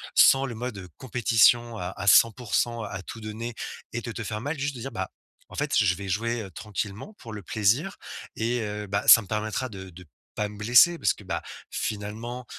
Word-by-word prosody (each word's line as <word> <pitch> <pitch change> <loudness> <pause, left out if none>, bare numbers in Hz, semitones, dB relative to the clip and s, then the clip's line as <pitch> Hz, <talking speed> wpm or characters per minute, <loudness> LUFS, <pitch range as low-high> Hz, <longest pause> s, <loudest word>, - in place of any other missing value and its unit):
sans 135 0 +6
le 120 -4 -5
mode, 120 -1 -5
heu, 90 -2 -8
compétition 120 -1 +3
à 90 -1 -4
à 100 - -5
100%, 115 +1 +3
à 100 -2 -5
tout 115 - -9
donner 110 +2 -5 0.4
et 120 - -1
de 120 - -5
te 115 - -5
faire 105 0 -4
mal. 145 +5 -3
Juste 145 +1 -2
de - - -8
dire: 135 - -5
«Bah 95 -5 -4 0.4
en - - -11
fait - - -1
je - - +4
je 90 - +3
vais 100 +2 -7
jouer, 115 +5 -1
heu, 95 - -10
tranquillement, 105 - -5
pour 115 -3 -9
le 105 -2 -7
plaisir 115 - +1 0.4
et 120 +2 0
heu, 105 -1 -4
bah 100 +1 -1
ça 115 - +10
me 100 - -12
permettra 110 +4 -2
de 95 -3 -9
de 90 +1 -13 0.3
pas 105 0 -1
me 105 - -11
blesser» 125 +11 +5
parce - - +2
que, - - -15
bah, 95 - -3 0.3
finalement, 110 +4 -4
110 Hz, 220 wpm, -26 LUFS, 105-120 Hz, 0.4 s, ça